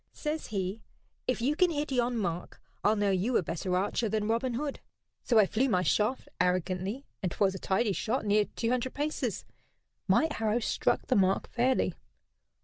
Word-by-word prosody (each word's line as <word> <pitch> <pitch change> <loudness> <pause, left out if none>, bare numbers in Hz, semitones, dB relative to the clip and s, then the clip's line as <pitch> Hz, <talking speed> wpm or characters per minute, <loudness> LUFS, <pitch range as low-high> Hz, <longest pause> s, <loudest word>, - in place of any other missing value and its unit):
Says 305 0 -3
he: 195 0 -3 0.5
'If 250 -2 0
you 285 +4 +2
can 360 +2 +4
hit 300 -3 -2
yon 245 -1 +1
mark 175 -4 -3 0.2
I'll 210 +2 +4
know 205 -1 +2
you 200 +6 +2
a - - +1
better 180 +3 -1
archer 205 +4 0
than 215 0 0
Robin 235 +2 0
Hood.' 285 +2 -3 0.4
So 235 - +2
I 215 - +7
flew 250 +7 +1
my 180 -4 +2
shaft 215 +7 +1
arrogantly, 185 +7 0 0.2
and 185 - -1
'twas 195 +1 +2
a 190 - -6
tidy 200 +2 +1
shot, 225 +4 -1
near 205 0 +3
two 230 +2 -2
hundred 255 +1 -1
paces. 295 +2 -2 0.6
My 320 - +4
arrow 220 0 +1
struck 240 - 0
the - - +1
mark 190 -1 +2
fairly. 245 -6 +2
220 Hz, 180 wpm, -30 LUFS, 190-255 Hz, 0.6 s, I